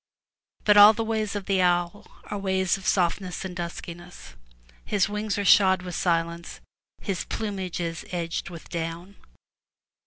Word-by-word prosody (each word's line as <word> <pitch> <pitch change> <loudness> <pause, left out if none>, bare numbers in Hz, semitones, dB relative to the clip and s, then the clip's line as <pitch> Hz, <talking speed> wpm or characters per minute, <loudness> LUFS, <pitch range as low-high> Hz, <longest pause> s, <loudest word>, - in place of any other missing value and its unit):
But 210 -1 +5
all 205 +1 +10
the 225 - -2
ways 220 -2 -2
of 200 -2 -4
the 195 -2 +1
owl 175 +3 0 0.2
are 210 - -5
ways 190 -2 +1
of 195 - -7
softness 180 0 0
and 180 -1 -6
duskiness. 175 0 -8 0.5
His 200 -3 +1
wings 210 0 -3
are 205 - -2
shod 190 -1 +5
with 180 -1 -6
silence, 170 -1 -1 0.4
his 195 -3 -2
plumage 195 -5 -4
is 165 -1 -4
edged 170 -2 -3
with 170 -2 -10
down. 170 +3 -5
185 Hz, 150 wpm, -25 LUFS, 175-205 Hz, 0.5 s, all